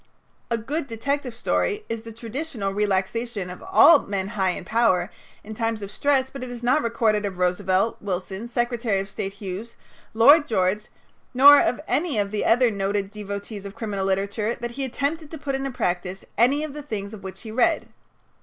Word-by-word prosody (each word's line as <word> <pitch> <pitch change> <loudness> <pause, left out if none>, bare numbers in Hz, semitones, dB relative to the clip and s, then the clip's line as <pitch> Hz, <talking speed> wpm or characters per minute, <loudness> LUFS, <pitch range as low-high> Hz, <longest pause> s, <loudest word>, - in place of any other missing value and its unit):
"A 230 - +1
good 280 +7 -3
detective 250 +2 -3
story" 420 - -1
is 230 -1 -4
the 230 0 -9
traditional 230 -2 -4
relaxation 200 0 -1
of 180 - -10
all 335 -4 +7
men 195 -3 -3
high 190 -3 0
in 180 - -4
power 215 -5 +2 0.3
in 220 - -8
times 225 -1 -2
of 200 - -7
stress, 270 +1 +1
but 270 -2 -7
it 255 - -6
is 245 -1 -8
not 250 +2 +3
recorded 225 -2 +1
of 195 -3 -4
Roosevelt, 185 +3 +1
Wilson, 190 +2 -4
Secretary 240 -3 0
of 195 - -4
State 195 0 -5
Hughes, 200 +3 -7 0.4
Lloyd 290 +7 +7
George, 210 -2 0 0.5
nor 285 +3 +9
of 245 - 0
any 305 -6 0
of 200 -1 0
the 215 - -1
other 245 +1 +4
noted 200 0 -2
devotees 200 0 -6
of 200 0 -8
criminal 210 -4 -3
literature 200 +4 -1
that 240 0 -5
he 270 +3 -3
attempted 285 +5 -2
to 320 - -7
put 285 -2 -4
into 270 0 -2
practice 185 -6 -3
any 265 +7 +3
of 310 -3 -5
the 295 - -6
things 210 -7 -5
of 210 - -9
which 190 -1 -8
he 220 - -8
read. 240 +2 +2
225 Hz, 190 wpm, -24 LUFS, 200-255 Hz, 0.5 s, nor